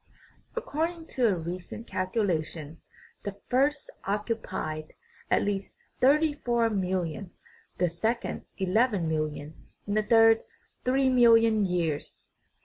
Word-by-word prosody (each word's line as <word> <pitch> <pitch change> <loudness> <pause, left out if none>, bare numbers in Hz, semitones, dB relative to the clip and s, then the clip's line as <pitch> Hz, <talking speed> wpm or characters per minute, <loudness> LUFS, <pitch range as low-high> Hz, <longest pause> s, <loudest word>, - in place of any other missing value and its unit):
According 325 +2 -2
to 250 -3 +2
a 200 - +2
recent 175 +6 -6
calculation, 170 -7 -2 0.4
the 200 -1 -5
first 280 +3 +1
occupied 200 -7 -3 0.4
at - - +3
least 200 -1 -3 0.2
thirty 300 +4 +4
four 235 -4 +1
mill 190 -2 0
ion, 170 +3 -6 0.5
the 180 - +2
second 220 +8 -2
eleven 200 -1 +2
million, 155 -1 -3 0.2
and 205 - -2
the 215 - +4
third 225 +1 +5 0.4
three 260 +1 +3
million 230 -4 +5
years. 165 -5 -2
205 Hz, 115 wpm, -28 LUFS, 175-240 Hz, 0.5 s, third